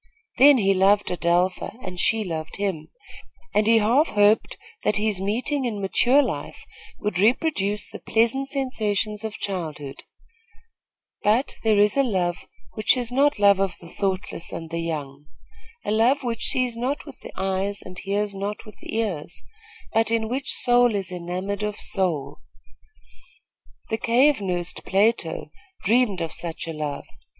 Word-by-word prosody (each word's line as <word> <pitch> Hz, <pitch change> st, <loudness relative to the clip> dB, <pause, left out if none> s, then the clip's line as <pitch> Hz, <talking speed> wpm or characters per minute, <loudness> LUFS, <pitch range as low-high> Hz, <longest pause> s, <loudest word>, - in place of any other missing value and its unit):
Then 280 Hz, +1 st, +8 dB
he 195 Hz, -4 st, +3 dB
loved 195 Hz, +2 st, +3 dB
Adelpha, 180 Hz, +3 st, 0 dB
and 180 Hz, -1 st, -6 dB
she 220 Hz, +3 st, +2 dB
loved 160 Hz, -4 st, -5 dB
him, 195 Hz, -6 st, -3 dB, 0.7 s
and 210 Hz, 0 st, +2 dB
he 225 Hz, 0 st, +6 dB
half 240 Hz, +9 st, +3 dB
hoped 205 Hz, +1 st, +2 dB, 0.3 s
that 210 Hz, -, +1 dB
this 210 Hz, -2 st, 0 dB
meeting 250 Hz, +8 st, -1 dB
in 225 Hz, -5 st, -2 dB
mature 245 Hz, +8 st, +3 dB
life -, -, -5 dB, 0.3 s
would 210 Hz, -3 st, -3 dB
reproduce 210 Hz, -, +1 dB
the -, -, -10 dB
pleasant 235 Hz, +4 st, +1 dB
sensations 215 Hz, -6 st, -1 dB
of 215 Hz, -1 st, -5 dB
childhood; 155 Hz, -8 st, -5 dB, 1.2 s
but 225 Hz, +6 st, +1 dB
there 220 Hz, -2 st, +3 dB
is 205 Hz, 0 st, +4 dB
a 275 Hz, -, +4 dB
love 180 Hz, -8 st, -1 dB, 0.3 s
which 215 Hz, +3 st, +3 dB
is 245 Hz, -1 st, -1 dB
not 285 Hz, +3 st, +3 dB
the 205 Hz, -, -5 dB
love 200 Hz, -1 st, +6 dB
of 195 Hz, -2 st, -1 dB
the 170 Hz, -, -13 dB
thoughtless 190 Hz, -1 st, -3 dB
and 165 Hz, 0 st, -7 dB
the 170 Hz, -, -2 dB
young 150 Hz, -3 st, -5 dB, 0.6 s
a -, -, -1 dB
love 240 Hz, +6 st, +3 dB
which 235 Hz, -2 st, -1 dB
sees 250 Hz, -2 st, +2 dB
not 255 Hz, +5 st, -2 dB
with 285 Hz, -4 st, -12 dB
the -, -, -10 dB
eyes 195 Hz, +1 st, -2 dB
and 185 Hz, 0 st, -9 dB
hears 200 Hz, +1 st, -1 dB
not 200 Hz, +3 st, -5 dB
with 215 Hz, -, -14 dB
the -, -, -7 dB
ears, 185 Hz, -8 st, -3 dB, 0.5 s
but 225 Hz, 0 st, +2 dB
in 225 Hz, -1 st, 0 dB
which 265 Hz, +4 st, -2 dB
soul 245 Hz, -2 st, +4 dB
is 195 Hz, -2 st, -2 dB
enamoured 180 Hz, +3 st, -4 dB
of 210 Hz, 0 st, -2 dB
soul. 155 Hz, -7 st, 0 dB, 1.5 s
The 220 Hz, -1 st, -1 dB
cave 250 Hz, +2 st, +3 dB
nursed 180 Hz, -2 st, -3 dB
Plato 190 Hz, -7 st, 0 dB, 0.3 s
dreamed 215 Hz, -3 st, +2 dB
of 165 Hz, -1 st, -3 dB
such 170 Hz, -1 st, -5 dB
a 165 Hz, -, -4 dB
love. 150 Hz, -2 st, -4 dB
205 Hz, 160 wpm, -24 LUFS, 180-230 Hz, 1.5 s, Then